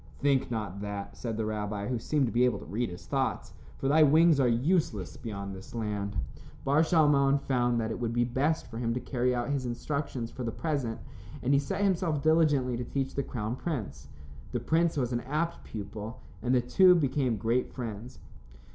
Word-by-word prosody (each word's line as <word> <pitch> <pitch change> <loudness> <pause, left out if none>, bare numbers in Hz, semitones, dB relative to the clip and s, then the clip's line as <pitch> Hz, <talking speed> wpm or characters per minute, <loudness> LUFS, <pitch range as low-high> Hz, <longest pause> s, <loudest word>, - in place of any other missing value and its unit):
"Think 140 -2 +2
not 105 -4 -4
that," 100 -1 -5
said 115 -3 -4
the 110 - -1
rabbi, 105 -1 -3
who 125 -2 -1
seemed 145 +4 +1
to 115 - -2
be 120 +1 +3
able 125 -5 +3
to 75 - -10
read 110 +10 -2
his 90 0 -9
thoughts, - - -1 0.2
"for 135 - -2
thy 155 +3 +5
wings 155 +1 +6
are 130 - +4
useless 120 - +1
beyond 100 -3 -6
this 95 +4 -10
land." 105 -2 -3 0.5
Bar 145 +3 +4
Shalmon 145 -4 +4
found 120 -3 +1
that 110 0 -1
it - - -4
would 120 -2 -1
be 120 +1 +2
best 135 +7 0
for 115 -1 -7
him 115 -1 -1
to - - -1
carry 125 0 0
out 120 +3 -1
his 135 -3 -1
instructions 125 -1 -3
for 130 - -6
the 115 - -2
present, 135 -6 -2 0.4
and 130 +3 +2
he 140 - +5
set 190 +8 -2
himself 170 -6 +1
diligently 150 -6 +3
to 125 - -3
teach 135 +2 -2
the 140 - 0
crown 115 -3 -3
prince. 105 - -4 0.5
The - - 0
prince 165 0 +1
was 125 -3 0
an 120 - 0
apt 155 +7 -2
pupil, 105 +2 -7 0.2
and 125 +3 +2
the 125 - +4
two 180 +9 +6
became 135 -6 +1
great 115 +4 0
friends. 115 -1 -6
125 Hz, 200 wpm, -29 LUFS, 115-145 Hz, 0.5 s, wings